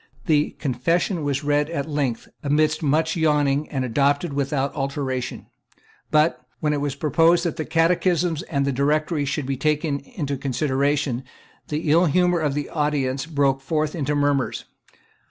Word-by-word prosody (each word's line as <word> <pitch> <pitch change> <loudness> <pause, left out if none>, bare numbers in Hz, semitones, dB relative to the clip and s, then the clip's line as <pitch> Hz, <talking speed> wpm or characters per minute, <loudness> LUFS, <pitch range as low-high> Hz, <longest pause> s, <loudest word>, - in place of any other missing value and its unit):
The 150 -2 +2
Confession 160 - 0
was 140 0 -1
read 145 +1 +1
at 150 -3 -3
length, 140 -6 -2
amidst 155 +2 +1
much 160 +2 +1
yawning, 150 -3 +1
and 130 -3 -2
adopted 140 +5 +1
without 140 0 -1
alteration. 135 -3 -3 0.6
But, 150 -4 +2 0.2
when 150 -1 0
it 145 - -1
was 145 -1 -2
proposed 165 +4 +3
that 170 - -1
the 155 -2 -3
Catechisms 170 0 +1
and 140 -3 0
the 140 - +1
Directory 150 +3 0
should 140 +1 -2
be 135 0 -2
taken 150 0 0
into 150 - -5
consideration, 135 0 0 0.4
the 150 0 -1
ill 170 +3 +5
humour 180 +2 +2
of 150 -3 0
the 145 -1 -2
audience 145 -2 -1
broke 140 -4 +1
forth 155 +2 -1
into 150 -3 -1
murmurs. 145 -3 0
145 Hz, 155 wpm, -23 LUFS, 140-160 Hz, 0.6 s, ill